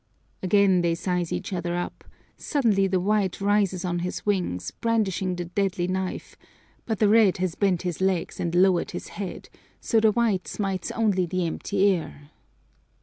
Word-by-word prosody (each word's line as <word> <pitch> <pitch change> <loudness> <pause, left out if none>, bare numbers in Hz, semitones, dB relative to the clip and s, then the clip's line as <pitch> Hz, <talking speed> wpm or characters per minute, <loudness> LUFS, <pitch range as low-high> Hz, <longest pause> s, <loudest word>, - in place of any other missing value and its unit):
Again 190 -1 +4
they 170 -1 +1
size 180 -1 -2
each - - -3
other 175 -1 -2
up: 175 - -5 0.3
suddenly 220 -10 +1
the 185 -1 +1
white 200 0 0
rises 200 -2 +1
on 175 -1 -1
his 180 +1 -4
wings, 175 - -1
brandishing 200 -5 -1
the 175 0 -4
deadly 180 0 -1
knife, 185 0 -4 0.5
but 220 -2 -1
the 210 - +3
red 210 -3 +5
has 185 -2 -1
bent 190 -3 +1
his 180 -1 -3
legs 190 -2 0
and 170 0 -2
lowered 185 -1 +3
his - - -8
head, 195 -3 -6 0.3
so 225 - +2
the 220 0 +4
white 220 -4 0
smites 195 -3 -3
only 200 -5 +1
the 185 +1 -1
empty 195 +4 0
air.. 160 -6 -1
190 Hz, 165 wpm, -25 LUFS, 175-205 Hz, 0.5 s, red